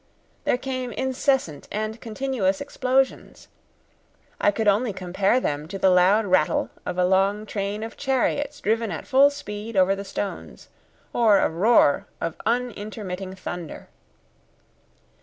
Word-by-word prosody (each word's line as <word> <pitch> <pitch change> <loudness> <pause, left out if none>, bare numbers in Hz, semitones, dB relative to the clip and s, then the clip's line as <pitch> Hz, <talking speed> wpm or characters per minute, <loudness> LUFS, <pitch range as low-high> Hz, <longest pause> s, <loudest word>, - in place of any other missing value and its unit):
There - - +2
came 255 -1 -4
incessant 265 - -1
and 215 +2 -3
continuous 225 -4 -1
explosions. 265 -1 -1 0.9
I - - +4
could 210 +1 -1
only 210 +2 +2
compare 190 +5 +1
them 150 - -2
to 195 +3 -6
the 190 -1 +4
loud 190 +4 +4
rattle 185 -5 +2 0.2
of 180 - -3
a 180 - +3
long 195 +3 +2
train 205 0 -3
of 225 - -7
chariots 280 +2 -1
driven 225 +1 0
at - - -5
full 275 +2 +5
speed 215 -6 -7
over 190 +1 +4
the 200 - -6
stones, 200 0 -6 0.4
or 220 -4 +5
a - - +2
roar 175 -3 +3
of 165 -1 -4
unintermitting 210 -5 -3
thunder. 175 -3 -7
210 Hz, 135 wpm, -24 LUFS, 190-245 Hz, 0.9 s, full